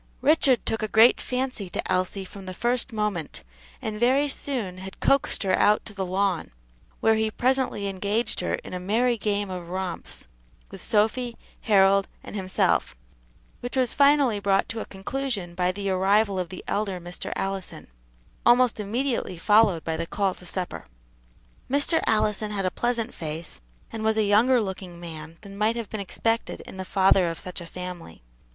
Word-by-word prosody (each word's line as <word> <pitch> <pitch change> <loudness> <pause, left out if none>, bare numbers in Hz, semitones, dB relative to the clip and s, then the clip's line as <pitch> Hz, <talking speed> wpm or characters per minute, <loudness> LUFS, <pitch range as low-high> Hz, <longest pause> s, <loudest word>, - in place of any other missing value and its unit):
Richard 270 -3 +4
took 225 - -1
a 215 - 0
great 225 +3 +6
fancy 255 -6 -3
to - - -3
Elsie 185 +1 0
from 195 0 -11
the 185 - -6
first 240 +4 +1
moment, 210 -8 -3 0.4
and 210 -1 -3
very 265 +5 +3
soon 240 -10 -3
had 190 +1 -9
coaxed 275 -5 +2
her 190 -1 +2
out 210 +1 +3
to 210 - -9
the 190 -2 -3
lawn, 190 -1 0 0.5
where 225 - +5
he 220 0 +1
presently 250 -3 0
engaged 200 +4 -1
her 180 - 0
in - - -10
a 180 - -3
merry 230 +7 +2
game 205 -3 -1
of 175 -2 -6
romps 185 -1 -4 0.5
with - - -9
Sophy, 230 +3 +1 0.2
Harold, 195 -1 +4 0.2
and - - -9
himself, 185 - +1 0.6
which 245 +2 -5
was 255 -2 +2
finally 280 -6 +4
brought 195 -1 +2
to 230 - -3
a - - -4
conclusion 200 -2 -4
by 180 +1 +1
the 195 +1 -3
arrival 195 +1 +2
of 180 -2 -3
the 185 - -8
elder 200 -3 -1
Mr. 175 +1 -6
Allison, 195 -1 -4 0.6
almost 240 -1 +4
immediately 230 -2 -2
followed 205 -2 +4
by 160 -1 -2
the 165 +1 -3
call 195 0 0
to 180 - -9
supper. 180 +1 -3 0.8
Mr. 285 +4 +3
Allison 215 -1 +1
had 200 -2 -2
a 185 - +1
pleasant 240 +1 -1
face, 160 +1 -5 0.3
and 220 - -5
was 220 0 +2
a 220 - +4
younger 225 +5 +4
looking 190 -4 -5
man 160 -1 -8
than 200 -1 -11
might 215 +3 +1
have 230 -3 -5
been 215 - -4
expected 225 +4 -2
in - - -11
the 190 - -4
father 190 -2 +4
of 165 - -5
such 180 +1 -6
a 170 - -8
family. 180 - -8
205 Hz, 175 wpm, -25 LUFS, 185-230 Hz, 0.8 s, great